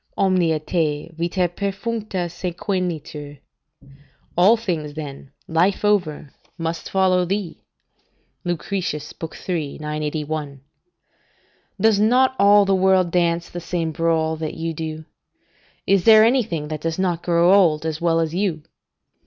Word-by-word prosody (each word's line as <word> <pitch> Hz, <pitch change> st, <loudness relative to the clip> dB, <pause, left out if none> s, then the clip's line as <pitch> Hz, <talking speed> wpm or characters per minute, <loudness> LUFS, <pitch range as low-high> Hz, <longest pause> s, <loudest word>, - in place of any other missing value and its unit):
"'Omnia 180 Hz, -4 st, +2 dB
te, 155 Hz, -1 st, -2 dB
vita 175 Hz, +2 st, 0 dB
perfuncta, 200 Hz, +1 st, -3 dB
sequentur.' 170 Hz, -5 st, -4 dB, 1.0 s
["All 195 Hz, +7 st, +5 dB
things, 165 Hz, -9 st, -3 dB
then, 140 Hz, -3 st, -7 dB, 0.2 s
life 180 Hz, +6 st, +1 dB
over, 175 Hz, -9 st, 0 dB, 0.3 s
must 165 Hz, 0 st, -4 dB
follow 185 Hz, -1 st, +2 dB
thee." 185 Hz, -1 st, -3 dB, 0.8 s
Lucretius, 175 Hz, -3 st, -3 dB, 0.3 s
iii. 160 Hz, -6 st, -2 dB
981.] 150 Hz, -2 st, -4 dB, 1.2 s
"Does 215 Hz, 0 st, +3 dB
not 255 Hz, +5 st, +3 dB
all 205 Hz, 0 st, +6 dB
the 195 Hz, -, +2 dB
world 190 Hz, -2 st, +3 dB
dance 170 Hz, -1 st, +1 dB
the 175 Hz, -, -7 dB
same 170 Hz, -1 st, -2 dB
brawl 160 Hz, -1 st, 0 dB
that 155 Hz, -1 st, -4 dB
you 165 Hz, 0 st, -3 dB
do? 155 Hz, 0 st, -6 dB, 0.8 s
Is 195 Hz, -2 st, +3 dB
there 220 Hz, -1 st, +8 dB
anything 215 Hz, -, +1 dB
that 155 Hz, -1 st, -5 dB
does 165 Hz, 0 st, -2 dB
not 180 Hz, -3 st, 0 dB
grow 170 Hz, +1 st, +3 dB
old, 165 Hz, -6 st, +4 dB
as 160 Hz, 0 st, -3 dB
well 165 Hz, -1 st, +2 dB
as 160 Hz, -1 st, -1 dB
you? 175 Hz, -5 st, -1 dB
170 Hz, 125 wpm, -21 LUFS, 155-190 Hz, 1.2 s, there